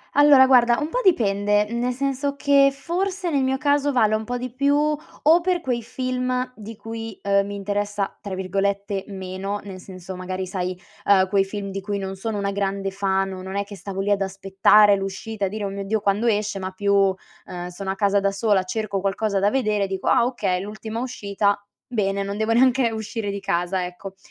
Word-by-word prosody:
Allora, 290 -2 +7
guarda, 245 -2 +5
un 300 - -2
po' - - -1
dipende, 205 - +3
nel 245 +1 -1
senso 275 +1 -1
che 280 -1 +4
forse 360 +5 -2
nel 280 -4 +1
mio 265 0 +1
caso 285 0 +1
vale 215 -4 +3
un 215 0 -1
po' 245 +2 -3
di 250 0 -5
più 280 +2 +2
o 300 +2 +2
per 355 0 0
quei 245 -6 -1
film 255 +1 -2
di 220 0 -9
cui, 225 -1 -7
ehm, 200 0 +2
mi 205 - -5
interessa, 205 0 -2
tra 195 -2 -6
virgolette, 195 +1 -1
“meno”, 195 +1 -5
nel 190 -2 -8
senso 185 0 -9
magari, 185 0 -4
sai, 185 -1 -3 0.3
ehm, 190 -2 +4
quei 195 -1 +3
film 200 0 -5
di 195 - -4
cui 200 +1 -3
non 190 -1 -5
sono 220 +1 -3
una 200 0 -1
grande 195 -1 -2
fan 195 -1 0
o 185 -1 -7
non 190 +1 -7
è 200 - 0
che 200 -1 -10
stavo 195 0 -5
lì 205 +1 0
ad 200 - +3
aspettare 195 +1 +4
l'uscita 195 +2 -4
e - - 0
a - - -4
dire: 210 0 -5
“Oh 200 - -1
mio 195 0 -5
Dio, 215 +1 0
quando 205 +3 +1
esce?” 210 -2 0
Ma 185 0 -4
più, 195 0 +2 0.3
ehm, 175 0 -6
sono 190 +2 -6
a - - -3
casa 200 0 +2
da 200 0 +1
sola, 200 -1 +2
cerco 200 0 -2
qualcosa 200 +1 0
da 200 +1 +3
vedere, 210 -6 0
dico: 190 -1 -4
“Ah, 240 -2 +4
okay, 195 -8 -1
l'ultima 215 +3 -6
uscita, 205 -5 0 0.3
bene, 200 -4 -1
non 200 +1 -3
devo 220 +1 0
neanche 245 0 +4
uscire 220 -1 -4
di 200 - -4
casa, 180 -1 -1
ecco.” 185 +2 -9
205 Hz, 210 wpm, -23 LUFS, 195-240 Hz, 0.3 s, Allora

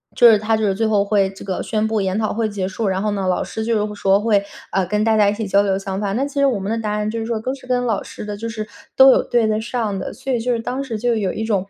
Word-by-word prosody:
就 240 - +7
是 220 - +6
他 220 +1 0
就 220 - -2
是 195 - +2
最 225 +2 0
后 205 -2 +2
会 200 -2 +2
这 195 - -11
个 190 -2 -3
宣 220 -1 -1
布 220 -1 0
研 190 0 -1
讨 215 - -1
会 225 0 0
结 195 -2 -3
束， 200 +2 -3
然 190 0 0
后 210 0 0
呢， 195 -2 -2
老 180 - +1
师 220 - -5
就 230 - +1
是 210 - 0
会 210 0 -6
说 195 -1 +3
会， 210 -3 +2 0.3
呃， 195 -1 +1
跟 210 +2 0
大 225 -1 +3
家 205 -1 +5
一 205 - 0
起 220 +1 -4
交 200 +1 +4
流 195 -1 +1
想 195 0 -4
法。 200 -1 -1
那 255 +6 0
其 285 - -9
实 280 - +4
我 250 -7 +1
们 195 +3 -3
的 230 - 0
答 215 -2 -2
案 210 0 -1
就 230 - -3
是 225 - -3
说， 230 -1 -2
都 255 +4 -3
是 265 - -12
跟 250 -1 0
老 220 -5 0
师 - - -9
的 210 0 -4
就 230 +2 -5
是 215 -1 -5 0.3
都 265 0 +8
有 - - +4
对 235 -2 +1
得 215 0 0
上 225 -4 -2
的， - - -5
所 260 +5 -5
以 240 - +1
就 245 +2 -1
是 230 - -1
当 255 +4 -3
时 230 -5 -4
就 240 0 +1
有 195 -4 -1
一 220 - -3
种 200 -4 -1
215 Hz, 370 characters per minute, -20 LUFS, 200-230 Hz, 0.3 s, 都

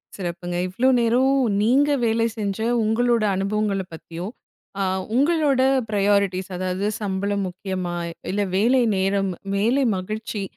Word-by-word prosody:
சிறப்புங்க. 175 -1 -5
இவ்ளோ 240 +8 +2
நேரமும் 260 +3 +3 0.2
நீங்க 270 +6 +3 0.2
வேலை 225 0 +2
செஞ்ச 200 -1 -2 0.2
உங்களோட 230 +1 +2
அனுபவங்களப் 195 -1 -1
பத்தியும், 170 +4 -7 0.5
அ - - +2 0.3
உங்களோட 285 -1 +3 0.3
ப்ரியாரிட்டீஸ் 200 -2 +1
அதாவது 185 +2 -2
சம்பளம் 200 0 -1
முக்கியமா 185 -1 -4 0.4
இல்ல 205 +2 0
வேலை 240 +6 +3 0.2
நேரம், 195 0 +1 0.2
வேலை 235 +8 +2
மகிழ்ச்சி, 215 +2 -4
205 Hz, 115 wpm, -23 LUFS, 190-235 Hz, 0.5 s, நேரமும்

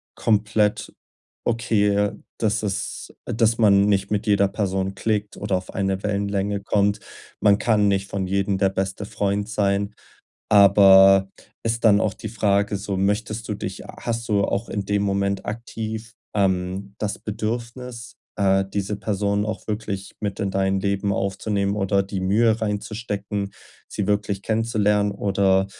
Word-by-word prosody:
komplett 105 -1 +1 0.5
okay, 105 -4 +2 0.3
dass 110 -1 0
es 100 -3 -4
dass 115 +1 +1
man 100 -2 +5
nicht 100 -1 +1
mit 105 +1 0
jeder 100 -1 +4
Person 95 -1 -2
klickt 105 -1 -2
oder 100 -2 0
auf 90 - -8
eine 95 -1 -1
Wellenlänge 100 -1 -1
kommt. 100 0 +1 0.4
Man 100 -1 +5
kann 105 -3 +3
nicht 100 0 0
von 100 -1 -2
jedem 100 +1 0
der 95 0 +3
beste 95 +1 -3
Freund 100 0 -1
sein. 100 0 0 0.6
Aber 95 -1 +7 0.3
ist 115 +1 -1
dann 105 -2 +6
auch 105 - 0
die 110 - -7
Frage 100 -1 +1
so, 100 0 -4
möchtest 110 +3 -1
du - - 0
dich 95 -2 -6
h - - -11
hast 115 0 -2
du 100 -1 +2
auch 105 +4 -1
in 100 -2 -3
dem 100 0 0
Moment 100 0 -1
aktiv, 110 0 -5 0.2
ähm, 95 0 0
das 105 -2 -2
Bedürfnis, 115 +2 -5 0.2
äh, 95 -1 +3
diese 100 +1 -3
Person 100 0 -1
auch 110 0 -5
wirklich 100 -3 -4
mit 100 -1 -3
in 100 -3 -1
dein 95 0 +1
Leben 100 0 0
aufzunehmen 100 +1 -1
oder 100 -1 +1
die 95 -1 -4
Mühe 110 +4 +2
reinzustecken, 105 -1 -3 0.4
sie 100 - -3
wirklich 100 -1 -1
kennenzulernen 105 -2 +1
oder, 100 -1 +2
100 Hz, 150 wpm, -23 LUFS, 100-105 Hz, 0.6 s, Aber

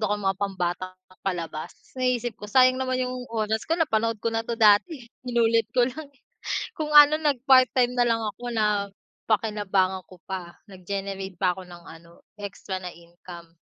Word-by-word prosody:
ako 210 -1 0
ng 205 -1 -6
mga 190 - -5
pambatang 185 -2 -2 0.3
palabas, 170 -4 -4 0.2
naisip 245 -3 -1
ko 210 - -8
sayang 255 +3 +4
naman 255 -1 -1
'yong 250 0 -4
oras 220 0 -1
ko 325 - +1
napanood 230 -9 0
ko 230 - 0
na 225 0 -2
to 235 - -2
dati, 230 - +3 0.2
inulit 230 -2 +2
ko 250 - +4
lang. 305 +4 -8 0.7
Kung 305 -1 -4
ano, 295 +1 +9
nag 290 -4 +1
part-time 255 -2 +5
nalang 230 -2 +1
ako 245 +4 -8
napakinabangan 205 -2 -1
ko 185 - -14
pa, 180 -2 -6 0.2
nag-generate 195 0 -5
pa 180 -1 +2
ako 185 0 -10
ng 175 -1 -12
ano 170 +1 -15 0.2
extra 195 -1 -6
na 180 - -6
income. 170 0 -14
210 Hz, 160 wpm, -25 LUFS, 185-245 Hz, 0.7 s, ano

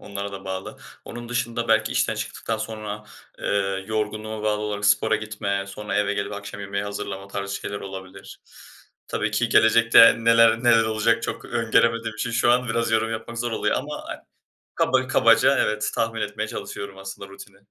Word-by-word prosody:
onlara 100 0 -6
da 95 0 -8
bağlı. 95 0 -5 0.3
Onun 120 0 -8
dışında 120 -1 -2
belki 110 - +3
işten - - +1
çıktıktan 115 - -4
sonra, 105 -1 -6 0.4
ııı, 95 -1 -1
yorgunluğuma 110 0 -3
bağlı 105 -1 0
olarak 105 -1 -3
spora 105 +1 +3
gitme, 100 -2 -3
sonra 105 +2 -5
eve 105 0 +1
gelip 100 0 -3
akşam 100 0 -7
yemeği 100 +1 -3
hazırlama 100 -1 -6
tarzı 100 0 -4
şeyler 100 - -5
olabilir. 95 0 -10 0.7
Tabii - - -1
ki - - 0
gelecekte 115 +1 +6
neler 115 0 +5
neler 115 -2 +6
olacak 110 +1 +1
çok - - -4
öngöremediğim 115 -1 +1
için 110 +2 -3
şu 120 +1 +2
an 125 0 +2
biraz 115 0 0
yorum 110 0 +1
yapmak 115 +1 -5
zor 120 -1 -2
oluyor - - 0
ama, - - -5
eee, - - -7 0.5
kaba - - +2
kabaca - - +4
evet 105 0 0
tahmin 115 0 -1
etmeye - - -3
çalışıyorum 100 -1 -7
aslında 95 0 -8
rutini. 100 0 -13
105 Hz, 170 wpm, -24 LUFS, 100-115 Hz, 0.7 s, gelecekte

